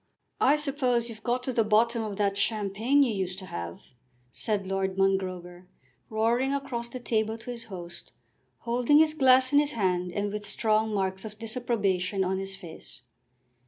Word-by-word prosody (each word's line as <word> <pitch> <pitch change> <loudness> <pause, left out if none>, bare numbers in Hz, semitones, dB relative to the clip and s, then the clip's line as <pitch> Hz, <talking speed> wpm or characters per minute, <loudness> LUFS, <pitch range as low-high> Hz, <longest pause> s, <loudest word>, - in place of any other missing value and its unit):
"I 280 - +5
suppose 265 -5 0
you've 220 -1 -10
got 245 +2 -1
to 260 - -2
the 230 - +3
bottom 225 +2 +3
of 210 -3 -4
that 200 -1 +1
champagne 215 +6 +2
you 240 -5 0
used 185 -2 -3
to 190 - -7
have," 85 - -6 0.5
said 205 - -1
Lord 190 0 -2
Mongrober, 185 -2 -1 0.4
roaring 235 +5 +1
across 240 -4 -4
the 255 - -7
table 220 -2 -1
to 230 +2 -7
his 235 -1 -7
host, 175 -3 -8 0.5
holding 245 +4 +3
his 310 0 +5
glass 260 -2 +5
in 285 - +7
his 295 0 +1
hand, 180 -4 0
and 205 +2 -2
with 210 -1 -4
strong 220 +1 +1
marks 190 -2 -1
of 215 -1 -8
disapprobation 210 -5 -1
on 190 +1 -1
his 195 0 -4
face. 170 -8 -11
215 Hz, 170 wpm, -28 LUFS, 190-240 Hz, 0.5 s, in